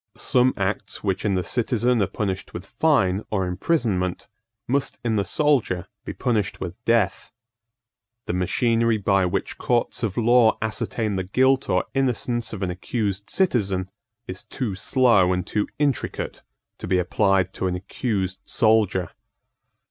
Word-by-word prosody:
Some 125 +1 +2
acts 100 +1 -2
which 95 -2 -1
in 100 -2 +1
the 90 - 0
citizen 120 0 +1
are 100 - +2
punished 95 -1 -4
with 90 +2 -6
fine 110 -7 +2
or 95 -3 0
imprisonment 90 - -1 0.4
must 135 +2 0
in 115 -2 +1
the 100 - +2
soldier 130 - +1 0.2
be - - -4
punished 110 -6 -1
with 95 +5 -7
death. 110 -5 +1 0.9
The - - -2
machinery 115 +5 +1
by 95 -2 +2
which - - -3
courts 120 -1 0
of 105 -5 -2
law 120 -1 +4
ascertain 110 -1 -2
the 95 - -1
guilt 130 +7 +2
or 90 -1 +2
innocence 125 -3 0
of 100 -3 -5
an 90 - -1
accused 100 +2 -3
citizen 100 - 0 0.4
is 95 +1 -6
too 125 -8 -4
slow 100 -2 +3
and 90 0 -2
too 105 +1 -1
intricate 145 -4 -2 0.4
to - - -6
be 90 +1 +2
applied 95 +1 +1
to 95 - -2
an 90 - -1
accused 95 0 -3
soldier. 105 -5 +2
105 Hz, 150 wpm, -23 LUFS, 95-120 Hz, 0.9 s, law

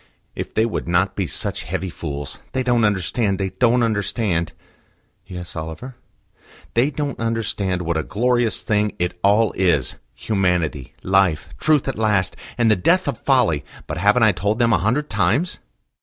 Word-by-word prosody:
"If - - -6
they 110 - +3
would 115 - -3
not 90 +3 +1
be 95 -3 -1
such - - -2
heavy 95 -2 -3
fools: 70 -4 -6
they 130 - 0
don't 120 -2 +3
understand; 100 +1 0
they 95 -1 -1
don't 125 +3 +2
understand." 100 -6 0 0.8
"Yes, 90 -2 -7
Oliver?" 80 +11 -6 0.8
"They 120 +5 +3
don't 145 -2 -4
understand 105 -5 -1
what 85 -1 -1
a - - +1
glorious 120 0 +1
thing 105 -2 +1
it 90 0 -2
all 105 +2 +4
is: 85 -8 +1 0.2
Humanity, 90 - -1
Life, 95 -5 +2
Truth 150 -3 +2
at 135 -5 -3
last, 100 -4 +1 0.2
and 115 -2 +3
the - - +5
death 170 - +2
of 130 -6 -2
Folly! 120 - +2 0.2
But - - -4
haven't 105 +5 +4
I 110 - +6
told 100 +4 -1
them 115 -1 +3
a 95 - +3
hundred 125 +10 0
times?" 110 - 0
105 Hz, 165 wpm, -21 LUFS, 90-120 Hz, 0.8 s, I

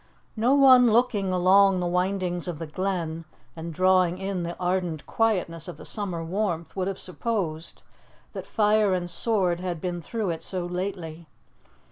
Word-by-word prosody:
No 240 +5 +3
one 260 -3 +7
looking 215 -5 +2
along 185 +1 +4
the 180 - -1
windings 180 0 -1
of 175 -3 -4
the 165 - -5
Glen, 165 -1 -3 0.3
and 165 0 -6
drawing 185 +1 +3
in 190 -1 -3
the 170 0 -5
ardent 180 -4 -1
quietness 180 -8 0
of 175 - -8
the - - -11
summer 185 -6 -4
warmth, 175 -1 -2
would 190 -1 -1
have 195 -1 -3
supposed 180 -5 -4 0.5
that - - -7
fire 210 -2 +3
and 175 -1 -3
sword 185 -2 0
had 180 -2 -4
been 175 0 -4
through 215 +1 -3
it 165 - -5
so 185 -2 -3
lately. 175 -3 -5
185 Hz, 160 wpm, -26 LUFS, 170-200 Hz, 0.5 s, one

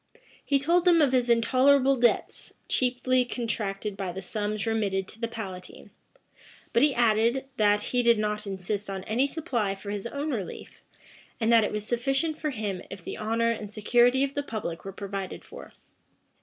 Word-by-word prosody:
He 280 - +2
told 340 +6 +2
them 345 -2 +6
of 290 -4 +4
his 250 -2 +2
intolerable 260 +3 +4
debts, 240 -1 0
chiefly 255 0 +1
contracted 215 -4 -3
by 195 -2 -4
the 190 +2 -7
sums 210 +2 -2
remitted 200 -4 0
to 225 - -14
the 230 - 0
palatine;[*] 195 -6 -8 0.8
but 235 - +4
he 290 -1 +4
added, 235 +3 +2
that 210 -1 +3
he 250 - +3
did 235 -1 +4
not 210 0 -2
insist 200 +2 -4
on 190 -1 -4
any 245 +6 +1
supply 245 - -2
for 200 +1 -7
his 205 +2 -4
own 285 +5 -3
relief, 210 -8 -6 0.6
and 230 0 +2
that 225 -1 +6
it - - -1
was 210 0 -3
sufficient 270 +7 0
for 305 - -1
him 210 -8 -3
if 195 -3 -9
the - - -5
honor 230 +2 0
and 215 -3 -5
security 240 +5 +3
of 275 0 -1
the 285 - -1
public 210 -11 -5
were 195 - -5
provided 195 -1 -6
for. - - -11
225 Hz, 180 wpm, -27 LUFS, 205-255 Hz, 0.8 s, them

